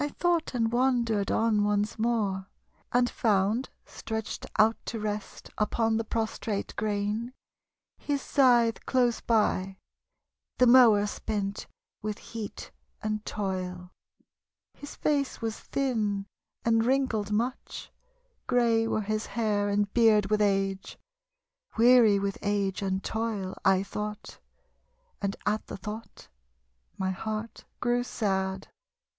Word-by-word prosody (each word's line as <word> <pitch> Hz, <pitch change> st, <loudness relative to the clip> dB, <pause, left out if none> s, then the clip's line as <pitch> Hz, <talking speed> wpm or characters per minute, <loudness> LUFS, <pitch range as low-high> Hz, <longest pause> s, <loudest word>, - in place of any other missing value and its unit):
I 290 Hz, -, -1 dB
tho't 345 Hz, -5 st, +1 dB
and 230 Hz, -2 st, +1 dB
wandered 240 Hz, -5 st, +1 dB
on 220 Hz, -2 st, +2 dB
once 210 Hz, +1 st, 0 dB
more, 210 Hz, -5 st, 0 dB, 0.4 s
And 245 Hz, 0 st, +3 dB
found 215 Hz, +2 st, +1 dB, 0.2 s
stretched 220 Hz, -1 st, -5 dB
out 220 Hz, +1 st, +5 dB
to 230 Hz, -, -3 dB
rest 210 Hz, -1 st, -5 dB
Upon 225 Hz, +1 st, +1 dB
the 225 Hz, -, -1 dB
prostrate 220 Hz, -2 st, -3 dB
grain, 215 Hz, +3 st, -2 dB, 0.7 s
his 285 Hz, -1 st, -1 dB
scythe 240 Hz, -5 st, +3 dB
close 245 Hz, -3 st, +2 dB
by, 195 Hz, -4 st, +1 dB, 0.8 s
The 250 Hz, -, +5 dB
mower 235 Hz, -5 st, +7 dB
spent 205 Hz, -1 st, -3 dB, 0.3 s
with 210 Hz, 0 st, -3 dB
heat 225 Hz, -3 st, -8 dB, 0.3 s
and 215 Hz, 0 st, -2 dB
toil. 185 Hz, -3 st, -4 dB, 0.8 s
His 290 Hz, -, -10 dB
face 285 Hz, -3 st, 0 dB
was 225 Hz, -2 st, -3 dB
thin 215 Hz, -7 st, -1 dB, 0.4 s
and 225 Hz, -1 st, +3 dB
wrinkled 240 Hz, -5 st, +1 dB
much. 235 Hz, +5 st, -3 dB, 0.6 s
Grey 230 Hz, -3 st, +3 dB
were 220 Hz, -, 0 dB
his 215 Hz, +1 st, -2 dB
hair 210 Hz, -3 st, 0 dB
and 205 Hz, 0 st, 0 dB
beard 215 Hz, -4 st, +4 dB
with 215 Hz, 0 st, +3 dB
age. 195 Hz, -1 st, 0 dB, 0.8 s
Weary 230 Hz, -3 st, +6 dB
with 195 Hz, 0 st, -2 dB
age 200 Hz, -2 st, -1 dB
and 190 Hz, -1 st, -1 dB
toil, 220 Hz, -4 st, -2 dB
I 190 Hz, 0 st, +4 dB
tho't, 210 Hz, +1 st, -6 dB, 0.8 s
And 200 Hz, -1 st, -1 dB
at 210 Hz, +1 st, 0 dB
the -, -, -6 dB
tho't 210 Hz, +3 st, -8 dB, 0.7 s
my 190 Hz, 0 st, -1 dB
heart 215 Hz, +3 st, -5 dB
grew 245 Hz, 0 st, +1 dB
sad. 190 Hz, -4 st, -2 dB
215 Hz, 120 wpm, -28 LUFS, 200-235 Hz, 0.8 s, mower